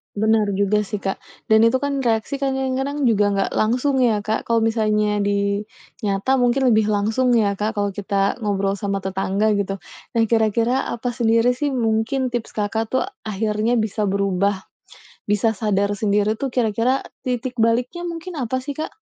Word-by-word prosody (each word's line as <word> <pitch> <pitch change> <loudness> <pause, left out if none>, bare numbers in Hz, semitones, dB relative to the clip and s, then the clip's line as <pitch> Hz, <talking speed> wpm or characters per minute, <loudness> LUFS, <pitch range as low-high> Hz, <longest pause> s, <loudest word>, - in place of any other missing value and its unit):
Bener 220 +1 +2
juga 200 +1 +1
sih, 205 0 -5
Kak, 195 - -2 0.3
dan 220 +1 +6
itu 230 - +3
kan 285 -1 -1
reaksi 235 +1 0
kan 275 -1 -1
kadang-kadang 265 +2 -2
juga 210 -2 +3
nggak 195 0 0
langsung 255 +5 +1
ya, 225 -5 +2
Kak. 215 +1 -2
Kalau 230 -1 +2
misalnya 215 -2 +1
di 200 0 0 0.4
nyata 200 +7 +1
mungkin 250 +1 +3
lebih 215 -2 +4
langsung 220 +4 +1
ya, 205 -4 +2
Kak, 215 +2 -1
kalau 205 -1 0
kita 200 0 -1
ngobrol 200 -3 -1
sama 195 0 -2
tetangga, 195 +2 0
gitu. 195 -1 -3 0.3
Nah, 230 - +3
kira-kira 230 +3 +2
apa 240 +1 -3
sendiri 230 0 +2
sih 290 0 -1
mungkin 235 +2 0
tips 240 -2 -4
Kakak 220 +2 -2
tuh 260 - +3 0.2
akhirnya 215 +2 0
bisa 215 -2 0
berubah, 200 0 0 0.7
bisa 210 +2 +2
sadar 205 -1 0
sendiri 210 +1 +1
tuh 275 - -1
kira-kira 245 +2 0 0.2
titik 250 0 -3
baliknya 245 +10 +1
mungkin 335 -1 -6
apa 255 +1 -2
sih, 290 - -4
Kak? 310 +7 -6
220 Hz, 165 wpm, -21 LUFS, 205-250 Hz, 0.7 s, dan